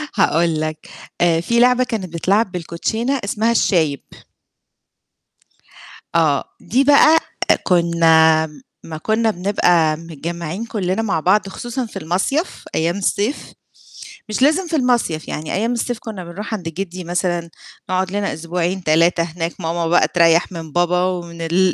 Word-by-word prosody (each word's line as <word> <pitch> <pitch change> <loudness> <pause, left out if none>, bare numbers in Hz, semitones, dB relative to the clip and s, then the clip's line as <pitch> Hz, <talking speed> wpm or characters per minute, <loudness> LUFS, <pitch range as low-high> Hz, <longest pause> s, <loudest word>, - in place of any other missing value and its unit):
هاقول 165 -1 +2
لك، 155 0 -5 0.3
آآ 165 -1 +3
في 235 +6 +1
لعبة 250 +1 +4
كانت 200 -8 -4
بتتلعب 195 +5 +1
بالكوتشينا 180 +9 -2
اسمها 225 -2 0
الشايب. 160 - +1 2.1
آه. 155 -4 +3 0.2
دي 260 +5 +1
بقى 290 +3 +6 0.4
كُنّا 165 -3 +4 0.4
أمّا 160 -1 -6
كُنّا 220 +6 +1
بنبقى 175 -5 +2
متجمّعين 170 +4 -6
كُلّنا 200 -2 -2
مع 195 -7 0
بعض 195 +5 +2
خصوصًا 240 +5 -4
في 225 - -8
المصيَف 190 - -2
أيام 170 +3 0
الصيف، 205 +6 -2 0.8
مش 215 +4 -2
لازم 315 +6 +3
في 330 - -2
المصيَف، 240 - 0
يعني 155 0 -5
أيام 225 +5 0
الصيف 240 0 -2
كُنّا 215 -6 -7
بنروح 195 +6 -7
عند 180 -6 -4
جِدّي 180 +2 -6
مثلًا 175 -1 -2 0.4
نقعُد 185 0 0
لنا 205 0 -2
أسبوعين، 175 +3 -3
3 165 +2 +3
هناك، 165 0 -4
ماما 165 0 -1
بقى 175 +2 +3
تريّح 170 0 +3
من 165 -3 -8
بابا 175 +2 +1
ومن 170 -2 -3
ال 175 +3 +2
180 Hz, 140 wpm, -19 LUFS, 165-220 Hz, 2.1 s, بقى